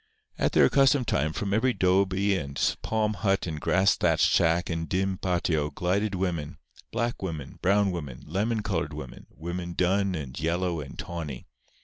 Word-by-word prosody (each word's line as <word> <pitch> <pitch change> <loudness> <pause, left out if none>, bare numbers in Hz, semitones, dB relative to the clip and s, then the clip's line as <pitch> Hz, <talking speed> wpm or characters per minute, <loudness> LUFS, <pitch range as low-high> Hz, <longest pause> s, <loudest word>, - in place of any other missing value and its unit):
At - - +1
their - - +6
accustomed 135 -2 +4
time, 75 +3 +1
from 100 +4 -2
every 125 +4 +2
'dobe 95 +1 +3
and 95 -8 0 0.2
palm 110 -1 0
hut 95 0 0
and 80 -3 -5
grass 95 +2 +3
thatched - - +3
shack 85 +1 +3
and 80 -1 -3
dim 95 0 0
patio 85 -5 0
glided 95 +7 -1
women—black 90 +6 -4
women, 80 -8 -5
brown 100 +1 +3
women, 75 -8 -6
lemon 105 +6 -1
colored 105 -2 -2
women, - - -9
women 85 +1 -5
dun 95 +2 +1
and 70 -4 -6
yellow 85 +1 0
and 70 - -10
tawny. 80 -7 -6
90 Hz, 155 wpm, -27 LUFS, 80-100 Hz, 0.2 s, their